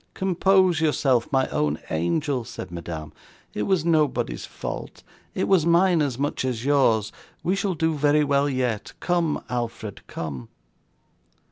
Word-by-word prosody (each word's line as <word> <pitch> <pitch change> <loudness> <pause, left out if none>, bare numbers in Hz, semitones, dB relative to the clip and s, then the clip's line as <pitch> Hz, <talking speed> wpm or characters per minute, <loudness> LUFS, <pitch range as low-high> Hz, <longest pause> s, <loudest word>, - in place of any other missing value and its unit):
'Compose 190 -2 +3
yourself, 135 -6 +2
my 135 -1 +2
own 75 0 0
angel,' 125 - 0
said 115 -6 -8
Madame. 80 -3 -6 0.4
'It - - -3
was 185 - +1
nobody's 150 - +1
fault; - - -7 0.3
it - - 0
was 190 -5 +4
mine 170 0 +4
as 135 -5 -1
much 145 0 -1
as 125 -2 -2
yours, 125 -7 +3 0.3
we 185 - +1
shall 195 -2 -1
do 160 0 +1
very 150 0 +3
well 140 0 +2
yet. 125 -5 -2
Come, 170 -3 0
Alfred, 115 -4 -4
come. 70 -7 -6
140 Hz, 140 wpm, -24 LUFS, 115-165 Hz, 0.4 s, was